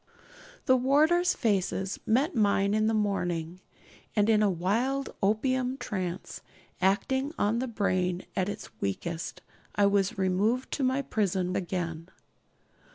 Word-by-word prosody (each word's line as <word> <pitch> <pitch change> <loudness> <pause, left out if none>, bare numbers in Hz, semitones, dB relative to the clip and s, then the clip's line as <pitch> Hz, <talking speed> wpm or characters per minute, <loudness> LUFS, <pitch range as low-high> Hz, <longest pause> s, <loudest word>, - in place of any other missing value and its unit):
The 260 - +5
warders' 305 +8 +3
faces 195 -4 0
met 275 +10 +2
mine 200 -2 +2
in 215 0 +2
the 225 - +2
morning; 180 -5 -1 0.6
and 210 +1 +3
in 215 -1 +4
a 210 - +4
wild 230 +10 -1
opium 255 +5 +1
trance, 185 -8 -4 0.4
acting 265 +9 +1
on 215 +3 +1
the 260 - -2
brain 185 -5 0
at 185 +1 0
its - - -7
weakest, 165 - -4 0.3
I 205 - +4
was 200 +2 +2
removed 200 +7 +1
to 280 - -1
my 260 +2 +1
prison 190 -6 -1
again. 170 -2 -3
205 Hz, 130 wpm, -28 LUFS, 185-255 Hz, 0.6 s, The